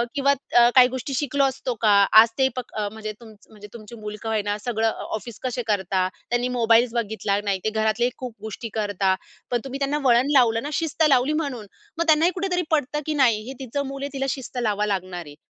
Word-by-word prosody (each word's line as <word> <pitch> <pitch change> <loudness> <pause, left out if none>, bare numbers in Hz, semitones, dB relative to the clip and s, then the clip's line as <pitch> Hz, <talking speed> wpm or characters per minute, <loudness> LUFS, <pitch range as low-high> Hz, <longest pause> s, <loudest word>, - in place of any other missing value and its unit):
किंवा 280 0 +3 0.2
अ, 240 0 +7
काही 250 -1 +8
गोष्टी 260 +2 -5
शिकलो 285 +1 0
असतो 265 -1 -1
का? 215 -2 +4 0.2
आज 220 +1 +8
ते 265 - +4
प - - -2 0.2
म्हणजे 215 +1 -4
तुमचं 220 -3 -16
म्हणजे 210 -1 -12
तुमची 230 0 -11
मुल 210 0 -6
का 225 - -3
होईना 210 -1 -1
सगळं 225 -2 0
अ, - - -6
ऑफिस 225 0 -8
कसे 250 -1 -2
करतात? 190 -3 0 0.2
त्यांनी 240 +1 0
मोबाइल्स 230 +1 +4
बघितला 215 -3 -1
नाही 195 -2 0
ते 215 - +1
घरातले 220 +2 +1
खूप 250 -3 -7
गोष्टी 220 +1 -6
करतात 200 -3 0 0.3
पण 245 - +1
तुम्ही 270 +1 -5
त्यांना 285 +2 0
वळण 245 +3 +4
लावलं 225 -2 +3
ना, 290 - -4
शिस्त 320 +1 0
लावली 265 +2 +3
म्हणून. 255 -8 -5 0.3
मग 335 - 0
त्यांनाही 320 +3 +4
कुठेतरी 365 -1 -1
पटतं 295 -1 0
की 310 - -1
नाही 225 -4 +3
हे 265 - -5
तिचं 280 +3 -3
मूल 275 0 -6
आहे 280 - -5
तिला 270 - -1
शिस्त 265 -1 -5
लावावं 210 -2 0
लागणार 185 -3 -3
आहे. 145 -1 -12
235 Hz, 215 wpm, -23 LUFS, 215-270 Hz, 0.3 s, काही